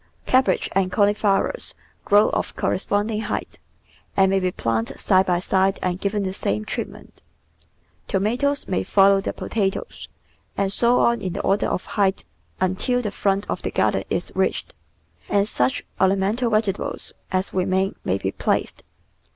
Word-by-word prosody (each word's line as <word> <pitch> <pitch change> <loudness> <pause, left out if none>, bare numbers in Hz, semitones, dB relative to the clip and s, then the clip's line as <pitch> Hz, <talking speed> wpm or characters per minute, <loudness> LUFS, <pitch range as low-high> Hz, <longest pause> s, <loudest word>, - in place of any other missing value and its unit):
Cabbage 260 0 +2
and 185 -1 +1
cauliflowers 205 - +1 0.3
grow 205 +1 +5
of - - -2
correspond 205 +3 0
ing 215 0 -1
height, - - -4 0.6
and 190 -1 +5
may 195 - +3
be 185 -1 0
planted 115 -6 -2
side 190 -1 +3
by 180 -1 +2
side 190 +2 +1
and 180 0 -1
given 205 0 0
the 190 -1 -2
same 105 - -2
treatment. - - -6 0.9
Tomatoes 245 +8 0
may 185 - 0
follow 195 0 +4
the - - -2
potatoes, 195 -4 -3 0.5
and 195 -1 +1
so 240 +3 +4
on 235 0 +3
in 185 -2 -3
the - - -3
order 195 +1 +1
of - - -2
height 195 -2 0 0.4
until 245 +7 0
the 210 - -2
front 200 0 0
of - - -3
the - - -2
garden - - +1
is - - -2
reached, - - -1 0.6
and 205 0 +2
such 125 -10 0 0.2
orna 190 +1 +4
mental 215 +6 0
vegetables 215 -3 -1 0.2
as 185 0 -1
remain 190 +1 +1
may 95 - 0
be 95 0 -2
placed. - - -1
195 Hz, 160 wpm, -23 LUFS, 185-210 Hz, 0.9 s, grow